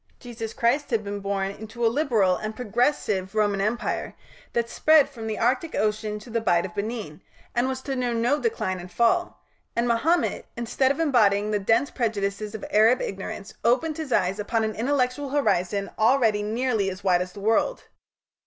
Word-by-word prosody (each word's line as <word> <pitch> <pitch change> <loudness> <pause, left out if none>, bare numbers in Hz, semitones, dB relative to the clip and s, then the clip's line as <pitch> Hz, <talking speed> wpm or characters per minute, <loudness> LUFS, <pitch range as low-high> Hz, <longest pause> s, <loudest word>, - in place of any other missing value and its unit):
Jesus 230 -3 -6
Christ 250 +7 +1
had 225 -4 0
been 205 0 -4
born 195 -1 -2
into 220 +3 -5
a - - +6
liberal 225 -11 +2
and 215 +2 -5
progressive 215 -5 0
Roman 205 -2 +2
Empire 225 +4 -2 0.4
that 235 -1 0
spread 310 +4 +4
from 235 -6 -8
the 220 - -3
Arctic 255 +7 0
Ocean 210 0 -1
to 210 +3 -12
the 230 0 0
Bight 175 -5 +2
of 180 - -8
Benin, 205 -7 -5 0.3
and 240 +1 +1
was 260 0 -4
to 270 - -3
know 250 -1 -1
no 240 +5 +1
Decline 190 - -1
and 180 +1 -10
Fall, 235 - +1 0.4
and 235 +1 +1
Mahomet, 295 +10 +1
instead 240 +3 +1
of 280 - -1
embodying 215 -9 +3
the 210 - +1
dense 225 +7 +2
prejudices 210 -2 -2
of 215 - -6
Arab 225 +4 +5
ignorance, 195 +1 -5
opened 265 +7 +2
his 310 -4 -5
eyes 190 -1 +1
upon 225 +2 0
an 220 0 -1
intellectual 255 +3 0
horizon 200 -8 0
already 220 -2 +3
nearly 220 -1 0
as 190 +1 -8
wide 180 -2 +3
as 180 0 -5
the - - -10
world. 225 - +1
225 Hz, 180 wpm, -25 LUFS, 200-250 Hz, 0.4 s, a